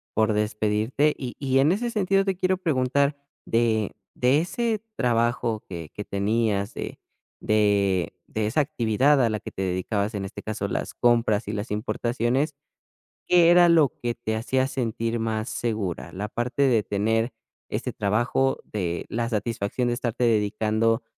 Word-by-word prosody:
por 110 0 +3
despedirte. 105 +7 +1
Y 125 -3 -6
y 135 -1 +2
en 145 +5 +4
ese 235 +5 -1
sentido, 195 -2 +2
te 190 -1 0
quiero 185 0 +1
preguntar, 140 -3 +1 0.3
de 115 -2 +1 0.2
de 130 +4 +3
ese 220 +4 -1
trabajo 120 -2 0
que 85 -4 -7
que 105 - -5
tenías, 100 0 0
de - - -6 0.4
de 100 -4 +2
de 110 -1 -2
esa 150 +8 +2
actividad 130 +1 +2
a 115 - +3
la 110 -1 -2
que - - -9
te 95 - -6
dedicabas, 100 +3 -1
en 95 -1 -3
este 95 - -8
caso, 110 -2 -3
las - - -3
compras 115 -3 +2
y 105 - -3
las 105 +3 -4
importaciones, 120 +6 -1 0.7
¿qué 175 -1 +6
era 175 -1 +7
lo 160 -5 +5
que 120 -1 -1
te 110 -2 -3
hacía 130 +4 0
sentir 115 -3 -2
más 110 0 -2
segura, 100 -8 -3
la 105 +3 -4
parte 125 +4 -1
de 120 -5 +4
tener 110 +4 0 0.4
este - - -3
trabajo, 120 +6 +1
de 90 -5 -3
la 115 0 -1
satisfacción 115 +2 -1
de - - +1
estarte 120 0 -2
dedicando 110 +1 +1
115 Hz, 160 wpm, -25 LUFS, 105-130 Hz, 0.7 s, era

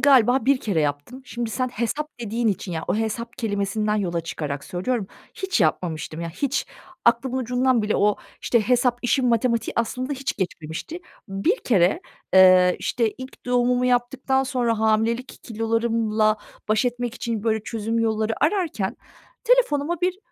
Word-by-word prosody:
galiba 260 -2 +5
bir 275 0 +4
kere 195 -10 0
yaptım. 145 - -3
Şimdi 240 -2 -4
sen 255 +3 -1
hesap 245 +7 -2
dediğin 230 +1 -1
için 190 -2 -2
ya, 160 0 -3
o - - +2
hesap 225 +2 -3
kelimesinden 210 0 -1
yola 175 -4 -1
çıkarak 150 -4 -5
söylüyorum, 195 +3 -2 0.3
hiç 380 - -1
yapmamıştım. 160 -1 -1
Ya, 170 - -3
hiç 265 - -1 0.4
aklımın 260 -1 +2
ucundan 250 -1 +1
bile 210 0 0
o, 205 0 +3 0.2
işte, 235 - +2
hesap 245 +2 +2
işin 250 +1 +2
matematiği 235 0 +1
aslında 255 +4 -1
hiç 270 -1 -3
geçmemişti. 175 - -5 0.3
Bir 195 - +1
kere, 185 -6 +3 0.3
eee, 185 -1 +7
işte, 230 -3 0
ilk 260 -1 -11
doğumumu 250 0 +2
yaptıktan 255 +2 +1
sonra 245 -4 0
hamilelik 225 +3 0
kilolarımla 225 -1 +1 0.3
baş 215 +3 +2
etmek 245 -1 -2
için 230 -5 -3
böyle 220 -2 +1
çözüm 225 0 -2
yolları 220 -1 0
ararken 315 - -1 0.5
telefonuma 345 - +2
bir 365 +1 0
230 Hz, 150 wpm, -23 LUFS, 210-255 Hz, 0.5 s, eee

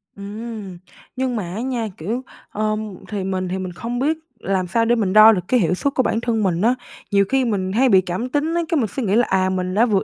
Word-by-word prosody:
Ừm. 205 -1 -7 0.4
Nhưng 260 -1 -1
mà 215 - -2
á 220 - -3
nha, 245 -3 -2
kiểu, 225 +11 -3 0.3
ờ, 215 0 -1 0.3
thì 205 -3 -3
mình 185 -1 -2
thì 185 - -2
mình 185 -1 -4
không 240 +6 -4
biết 310 +4 +1 0.2
làm 190 -2 -1
sao 230 +6 +1
để 235 +1 +3
mình 200 -5 0
đo 215 +1 +9
được 195 -5 +1
cái 250 - +3
hiệu 180 -4 +2
suất 275 +9 -1
của 260 - +3
bản 230 - 0
thân 225 -3 0
mình 175 -3 +1
á. 240 +4 +3 0.4
Nhiều 200 -1 +4
khi 270 -1 +2
mình 195 -5 -1
hay 250 +6 +3
bị 190 -4 +6
cảm 185 +7 -3
tính 290 +4 0
á, 345 - +2
cái 330 - +2
mình 230 -6 +1
sẽ 265 - -4
nghĩ 200 -1 +1
là: 240 +2 +3
à, 185 0 +2
mình 185 -1 -2
đã 220 +5 +4
vượt 205 -5 +1
215 Hz, 265 wpm, -21 LUFS, 190-245 Hz, 0.4 s, đo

